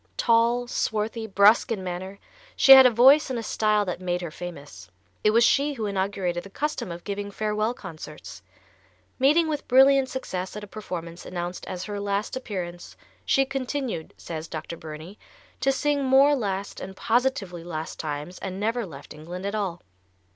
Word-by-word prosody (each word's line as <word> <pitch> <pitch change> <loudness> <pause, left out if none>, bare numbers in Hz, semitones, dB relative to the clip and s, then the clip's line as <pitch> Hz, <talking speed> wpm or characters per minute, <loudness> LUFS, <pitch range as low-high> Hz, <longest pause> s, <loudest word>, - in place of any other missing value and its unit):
Tall, 235 +1 +3
swarthy, 220 -1 -2
brusque 200 +3 +4
in 200 -4 -2
manner, 185 +2 -5 0.4
she 270 - +5
had 265 -1 +11
a - - +5
voice 265 +6 +6
and 255 - -2
a 230 - -4
style 215 -1 +1
that 180 -1 -4
made 180 -1 -1
her 170 -3 -5
famous. 145 - -9 0.3
It - - +5
was 230 +2 +4
she 285 +4 +3
who 225 -5 -4
inaugurated 190 -3 -1
the 195 - -11
custom 295 - -3
of 170 +1 -8
giving 205 0 -4
farewell 215 +3 -1
concerts. 170 -8 -10 0.8
Meeting 305 +5 +4
with 300 -2 -3
brilliant 270 +1 +5
success 190 -9 -5
at 210 - -6
a - - -8
performance 175 -5 -7
announced 175 0 -5
as 185 -1 -5
her 205 0 -5
last 200 +2 -2
appearance, 180 -8 -6 0.3
"she 270 - +3
continued," 265 - -4
says 160 -1 -6
Dr. 165 +1 -6
Burney, 160 +5 -10 0.4
"to 270 - +2
sing 285 +1 0
more 270 +2 +5
last 200 -5 -3
and 190 +1 -8
positively 225 -8 0
last 160 -2 -6
times 150 +3 -5
and 190 0 -5
never 225 +1 -1
left 140 -4 -11
England 175 +5 -8
at 200 - -2
all." 195 -5 -3
205 Hz, 170 wpm, -25 LUFS, 175-245 Hz, 0.8 s, had